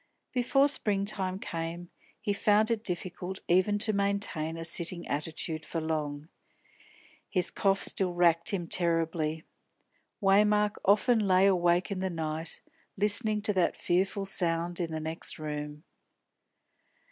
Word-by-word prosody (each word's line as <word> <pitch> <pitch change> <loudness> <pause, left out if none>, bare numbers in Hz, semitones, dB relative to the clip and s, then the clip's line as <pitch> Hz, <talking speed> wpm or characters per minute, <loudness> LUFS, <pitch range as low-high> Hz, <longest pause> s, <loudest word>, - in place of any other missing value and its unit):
Before 265 +3 +3
springtime 200 -6 0
came 170 -1 -6 0.3
he 210 -1 -1
found 210 +2 +2
it 225 -2 -1
difficult 180 0 -4
even 185 +4 +3
to 215 +1 +1
maintain 200 -5 -1
a 165 - -5
sitting 170 +1 -1
attitude 155 +1 -3
for 165 - -4
long. 155 -2 -3 1.0
His 180 -2 -1
cough 195 -1 +1
still 180 -2 -1
racked 170 -1 +4
him 185 -4 -1
terribly. 165 -2 0 0.8
Waymark 210 +1 +3
often 215 +4 +3
lay 185 0 +4
awake 175 0 +2
in 195 - -3
the 190 0 -1
night, 160 -1 -2 0.4
listening 210 +1 +3
to 210 - +3
that 185 -2 +1
fearful 195 +3 0
sound 175 -2 -1
in 170 -2 -2
the 160 - -3
next 160 +1 -3
room. 150 0 -6
180 Hz, 130 wpm, -29 LUFS, 165-200 Hz, 1.0 s, racked